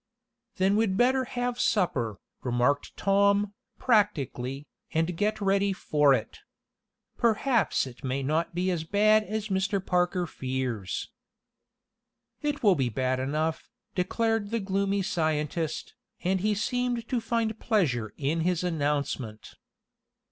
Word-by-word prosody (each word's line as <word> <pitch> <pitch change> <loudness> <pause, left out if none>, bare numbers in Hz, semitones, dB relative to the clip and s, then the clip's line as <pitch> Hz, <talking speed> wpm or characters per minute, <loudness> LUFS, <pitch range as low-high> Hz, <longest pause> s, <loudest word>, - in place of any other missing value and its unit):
"Then 195 +2 +2
we'd 210 -4 +1
better 260 +2 +3
have 245 -1 -3
supper," 125 - +1 0.2
remarked 125 +3 0
Tom, 200 +1 +3 0.2
practically, 145 - +1 0.3
"and 165 +2 0
get 210 +4 0
ready 200 0 +2
for 150 -6 +3
it. - - -5 0.8
Perhaps 235 - +2
it 130 -2 -11
may 135 +1 -1
not 160 +5 0
be 185 +1 +1
as 170 -3 -1
bad 215 +5 +4
as 215 0 -4
Mr. 195 +1 +1
Parker 180 -1 +1
fears." 130 - -3 1.3
"It 295 -2 -2
will 205 -3 +6
be 135 -7 0
bad 130 +2 0
enough," 155 +4 -2 0.2
declared 225 +3 0
the 230 +1 0
gloomy 195 0 0
scientist, 155 -2 -1 0.3
and 190 +1 +1
he 210 +1 +1
seemed 245 +2 -1
to 245 -2 -1
find 225 -1 -1
pleasure 130 - +1
in 150 +4 0
his 175 +1 0
announcement. 145 -9 -2
185 Hz, 125 wpm, -28 LUFS, 145-215 Hz, 1.3 s, will